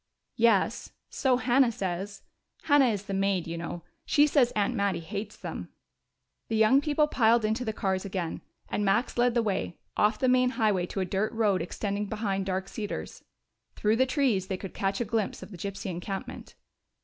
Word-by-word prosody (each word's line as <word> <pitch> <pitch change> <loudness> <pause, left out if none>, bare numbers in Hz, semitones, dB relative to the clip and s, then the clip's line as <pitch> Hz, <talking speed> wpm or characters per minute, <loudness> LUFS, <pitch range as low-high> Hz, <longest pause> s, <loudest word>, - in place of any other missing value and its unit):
"Yes, 230 -1 +2 0.2
so 260 -2 +2
Hannah 245 +1 +3
says 195 0 -4 0.4
Hannah 285 -4 +5
is 205 -4 -1
the 200 -1 -5
maid, 195 -2 +1
you 165 - -5
know. 170 0 -5 0.2
She 295 -1 +4
says 275 -5 +3
Aunt 205 -1 +1
Mattie 200 -3 0
hates 200 +5 -6
them." - - -6 0.8
The 225 - -2
young 220 +6 +5
people 300 +1 +2
piled 230 -5 +3
into 220 +4 0
the 220 - -1
cars 190 -3 -1
again, 185 -4 -4 0.3
and 210 - -1
Max 200 +5 +1
led 245 0 +2
the 235 - +3
way, 195 -4 -2 0.2
off 210 +1 +3
the 260 - +1
main 250 0 +4
highway 205 -6 +2
to 195 - -3
a - - 0
dirt 195 +4 -1
road 210 -4 +2
extending 205 +3 -3
behind 195 -3 -2
Dark 190 0 -2
Cedars. 210 -2 -6 0.5
Through 215 +1 +1
the 260 +1 +3
trees 250 -9 +1
they 190 - -2
could 190 0 -8
catch 195 +2 -1
a - - 0
glimpse 220 -1 -2
of - - -11
the - - -8
gypsy 200 +2 -5
encampment. 185 +3 -6
210 Hz, 185 wpm, -28 LUFS, 195-235 Hz, 0.8 s, Hannah